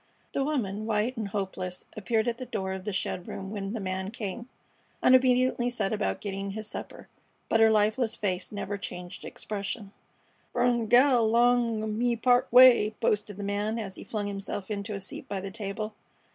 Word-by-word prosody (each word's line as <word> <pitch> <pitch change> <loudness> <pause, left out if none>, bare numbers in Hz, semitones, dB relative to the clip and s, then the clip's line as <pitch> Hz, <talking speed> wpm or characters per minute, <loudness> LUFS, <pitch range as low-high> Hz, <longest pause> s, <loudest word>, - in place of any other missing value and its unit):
The 275 - +1
woman, 215 -8 -2
white 220 +3 0
and 220 -3 -3
hopeless, 190 -2 -4
appeared 220 +1 0
at 235 0 -1
the 255 - -5
door 190 -5 -3
of 190 0 -6
the 210 - -1
shed 185 -1 -3
room 195 0 -6
when 200 -1 -4
the 230 - -3
man 190 0 -3
came, 230 +2 -6 0.5
and 255 - +5
obediently 255 -1 +4
set 215 -4 -1
about 210 -1 -1
getting 195 -1 -4
his 220 +1 -4
supper; - - -7 0.4
but 225 - +3
her 225 0 +7
lifeless 220 +2 +2
face 185 -3 -2
never 205 -1 -4
changed 180 -2 -7
expression. 200 0 -5 0.6
"Brung 245 -1 +2
a 225 - -3
gal 245 -1 +5
'long 235 -1 +3
of 220 - -2
me 235 +2 +1
part 245 +2 +3
way," 245 -4 +7
boasted 210 -1 0
the 205 - -5
man, 205 +3 -1
as 205 -4 -4
he - - -9
flung 210 -2 -3
himself 200 0 -4
into 205 +1 -3
a - - -4
seat 195 - -6
by 195 - -2
the 195 +1 -6
table. 215 +1 -4
215 Hz, 190 wpm, -28 LUFS, 195-235 Hz, 0.6 s, her